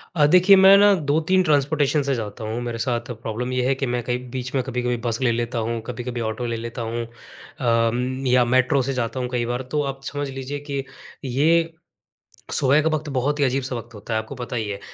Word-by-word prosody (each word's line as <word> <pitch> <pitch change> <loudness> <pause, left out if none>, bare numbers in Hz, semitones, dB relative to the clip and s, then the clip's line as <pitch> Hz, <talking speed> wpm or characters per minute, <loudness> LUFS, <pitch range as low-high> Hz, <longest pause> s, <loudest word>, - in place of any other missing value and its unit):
अ, 150 - +5
देखिए 180 +4 +7
मैं 190 +1 +8
ना 205 0 +6 0.2
2-3 165 +5 +3
ट्रांसपोर्टेशन 145 -1 +2
से 135 -1 0
जाता 110 0 -6
हूँ। 110 +2 -3
मेरे 120 -1 -4
साथ 120 +1 -2
प्रॉब्लम 120 +3 -3
ये 125 0 0
है 135 - +2
कि 135 - -2
मैं 120 0 -1
कहीं 125 +1 -3
बीच 125 -1 -5
में 130 - +1
कभी-कभी 125 -1 -2
बस 115 -1 -1
ले 120 -2 +3
लेता 120 +1 -2
हूँ। 115 0 -2
कभी-कभी 120 -1 -4
ऑटो 110 +2 -3
ले 115 -1 -2
लेता 115 +1 -6
हूँ। 115 +1 -3
अ, - - -15 0.8
म 130 +2 -2
या 125 0 +4
मेट्रो 130 +2 +3
से 135 +2 -2
जाता 125 +1 -2
हूँ 125 -1 -2
कई 120 -1 0
बार। 120 +2 -2
तो 150 -1 +1
आप 135 - -21
समझ 145 -1 -3
लीजिए 135 +2 -5
कि 140 -1 -2 0.4
ये 160 +6 +2 0.8
सुबह 140 +2 +3
का 160 - +2
वक़्त 155 0 -5
बहुत 145 +4 0
ही 145 - +3
अजीब-सा 130 0 -1
वक़्त 120 0 -8
होता 105 +2 -6
है, 110 - +2
आपको 110 +5 -7
पता 125 0 -6
ही 110 -2 -2
है। 100 -1 -4
125 Hz, 230 wpm, -23 LUFS, 120-140 Hz, 0.8 s, मैं